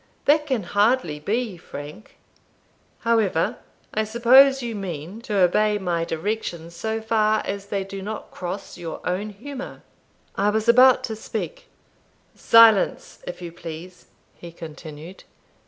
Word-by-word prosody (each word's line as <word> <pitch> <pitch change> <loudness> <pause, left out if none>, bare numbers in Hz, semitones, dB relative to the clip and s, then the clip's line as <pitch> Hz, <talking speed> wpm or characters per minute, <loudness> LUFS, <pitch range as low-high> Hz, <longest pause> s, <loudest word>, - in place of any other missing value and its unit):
That 300 +1 +3
can 255 -7 0
hardly 205 -4 +1
be, 215 +3 -2
Frank; 150 +6 -10 0.8
however, 220 -8 +1 0.4
I 215 - +1
suppose 255 +4 +5
you 235 -1 -3
mean 185 0 -6
to 215 -4 -3
obey 210 +3 +3
my 175 -4 -1
directions, 170 -2 -4
so 220 +5 -2
far 215 -1 +2
as 200 0 -5
they 200 -1 -2
do 195 0 -7
not 215 +2 -6
cross 180 0 -6
your 170 -2 -6
own 190 +4 -2
humour?" 260 +6 -9 0.5
I 200 +1 +2
was 220 +2 -1
about 255 +2 +6
to 225 -4 -3
speak - - -6 0.7
"Silence, 225 -3 +4
if 180 0 -7
you 170 - -6
please," 170 +2 -10 0.3
he 170 - -11
continued. 160 +1 -10
205 Hz, 135 wpm, -23 LUFS, 175-230 Hz, 0.8 s, about